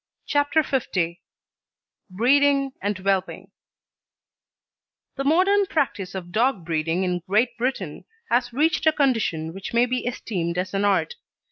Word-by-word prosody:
CHAPTER 290 +2 +2 0.3
L 170 -2 +1 1.0
BREEDING 275 +7 +3
AND 205 0 -1
WHELPING 190 0 -2 1.6
The 275 - -3
modern 380 +7 +3
practice 205 - -2
of 175 -2 -6
dog 220 -3 +1
breeding 165 +2 -1
in 180 -1 -1
Great 235 +4 +2
Britain 235 - -3 0.3
has 245 +1 +2
reached 315 +5 +1
a 315 - +6
condition 225 - 0
which 195 +4 -7
may 240 +1 +5
be 250 0 -2
esteemed 180 -8 -3
as 185 +1 -2
an 200 +1 +1
art. 200 - +1
220 Hz, 130 wpm, -24 LUFS, 185-275 Hz, 1.6 s, a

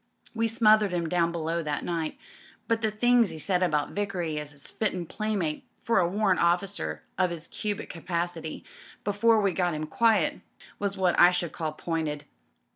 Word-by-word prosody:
We 230 0 +1
smothered 215 -3 +4
him 170 -2 -1
down 170 0 +1
below 165 0 -2
that 150 -2 -3
night, 165 -2 -2 0.5
but 225 0 +1
the 220 - +2
things 235 +1 +3
*e - - -7
said 180 +3 0
about 155 -5 +1
Vickery 180 -7 -2
as 150 -1 -7
a 145 - -18
fittin' 180 +4 -3
playmate 195 -5 -2 0.2
for 230 -4 +3
a 175 - +3
Warrant 195 0 +1
OflScer 170 - 0 0.2
of 185 -2 +3
'is 170 -1 -7
cubic 210 0 -4
capacity, 170 -1 -4 0.4
before 220 +2 +3
we 200 -2 +2
got 175 -2 0
him 155 0 -3
quiet, 215 +1 +2 0.4
was 200 -1 -2
what 185 -2 +2
I 175 - +9
should 175 -2 -1
call 155 -2 -3
pointed." 155 -2 -3
175 Hz, 175 wpm, -27 LUFS, 160-205 Hz, 0.5 s, I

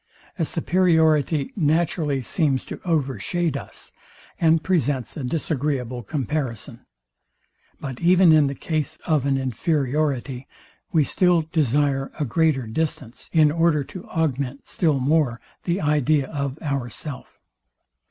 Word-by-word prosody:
A 165 - +2
superiority 160 -4 +2
naturally 155 -4 +1
seems 135 +1 0
to - - -7
overshade 155 - -1
us, - - -6 0.5
and 160 -1 +3
presents 145 - 0
a 145 - -5
disagreeable 130 -3 -2
comparison. 130 -1 -4 0.9
But 130 -3 -6
even 180 0 +5
in 155 -2 +5
the 140 - -3
case 155 +1 -3
of 150 -5 +1
an 135 -1 +2
inferiority, 135 -1 -1 0.4
we 160 -3 +4
still 175 +3 +2
desire 145 -3 +1
a 150 - +1
greater 145 0 +1
distance, 125 0 -4
in 155 -3 +5
order 165 -2 +2
to 180 +6 -10
augment, 140 -4 -2
still 155 -6 +1
more 135 -3 +1 0.3
the 175 +2 0
idea 150 -2 +2
of 140 -2 -3
ourself. 140 -1 -4
150 Hz, 120 wpm, -23 LUFS, 135-160 Hz, 0.9 s, even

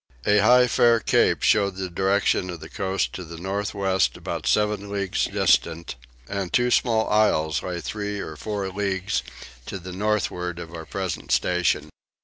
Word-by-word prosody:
A 105 0 +4
high 125 +4 +6
fair 120 -1 +4
cape - - +2
showed 100 -2 +3
the 95 0 -3
direction 95 +1 +1
of 85 -2 -6
the - - -10
coast 95 0 -1
to 90 - -6
the 85 0 -9
north 100 +4 -3
west 95 -1 +1
about - - -5
seven 105 -1 +1
leagues 100 -2 -1
distant; 85 -3 +1 0.3
and 100 -3 -3
two 125 0 +2
small 115 -3 +2
isles 80 -8 +2
lay 90 -2 -4
three 105 +3 -4
or 80 -5 -6
four 100 +4 -3
leagues 95 -3 -1 0.5
to - - -4
the 90 0 -8
northward 90 -3 -1
of 85 -1 -8
our 80 -1 -8
present 95 -2 -4
station. 90 -2 +1
95 Hz, 165 wpm, -24 LUFS, 90-105 Hz, 0.5 s, high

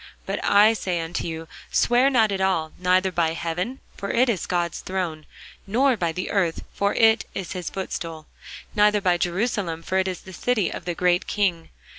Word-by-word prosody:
But - - -3
I 210 +2 +6
say 185 -5 -2
unto 165 +1 -3
you, 165 0 -5 0.2
Swear 245 +3 +4
not 225 -6 +3
at 195 -1 -1
all; 165 -5 +1
neither 185 +1 +2
by 165 -2 +1
heaven; 175 +10 -3
for 200 - -5
it 250 +2 +3
is 200 -8 -1
God's 175 -2 -1
throne: 175 -5 -4 0.4
nor 255 +6 +3
by 170 -6 -1
the 180 +3 -4
earth; 180 -5 0
for 200 0 0
it 225 0 +5
is 190 -4 -4
his 180 -2 -4
footstool: 165 -4 -5 0.5
neither 210 0 +4
by 180 -3 +2
Jerusalem; 175 -3 -1
for 190 +2 0
it 190 - +1
is 185 -2 -4
the 190 - -12
city 215 -1 0
of - - -7
the 175 -1 -2
great 180 0 +2
King. 180 -5 0
185 Hz, 190 wpm, -24 LUFS, 170-210 Hz, 0.5 s, I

